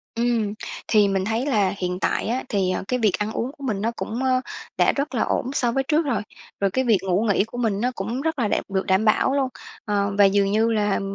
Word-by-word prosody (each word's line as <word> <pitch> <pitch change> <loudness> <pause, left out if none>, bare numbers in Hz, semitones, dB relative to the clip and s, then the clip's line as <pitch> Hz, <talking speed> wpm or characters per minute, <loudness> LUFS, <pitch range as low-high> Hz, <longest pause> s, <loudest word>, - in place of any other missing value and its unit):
Ừm. 230 -3 0 0.3
Thì 210 -2 +4
mình 195 -1 0
thấy 225 +5 -1
là 205 -9 +2
hiện 180 0 -3
tại - - 0
á, 245 +3 -1
thì, 190 -3 +1
ờ, - - -2
cái 250 0 0
việc 215 -4 +3
ăn 210 +1 -1
uống 245 +4 -3
của 280 - -12
mình 215 -7 -2
nó 230 - 0
cũng, 240 +4 -4
ờ, 255 -1 +2 0.4
đã - - +4
rất 280 -1 -3
là 230 - +1
ổn 255 - -1
so 240 -4 +1
với 270 +2 0
trước 310 +3 +1
rồi. 235 -8 0 0.4
Rồi 195 -1 +1
cái 260 +3 0
việc 220 -4 +4
ngủ 190 +1 +1
nghỉ 200 -3 +2
của 225 +3 -9
mình 220 -4 0
nó 250 - +1
cũng 225 +7 -3
rất 320 -2 -2
là 225 - +2
đẹp - - 0
được 190 -1 -1
đảm 190 +3 +2
bảo 220 +5 +3
luôn, 270 -2 +1 0.4
ờ. 200 -1 0
Và 205 - +7
dường 195 0 +3
như 220 +2 +2
là 210 -2 +1
220 Hz, 260 wpm, -23 LUFS, 200-250 Hz, 0.4 s, Và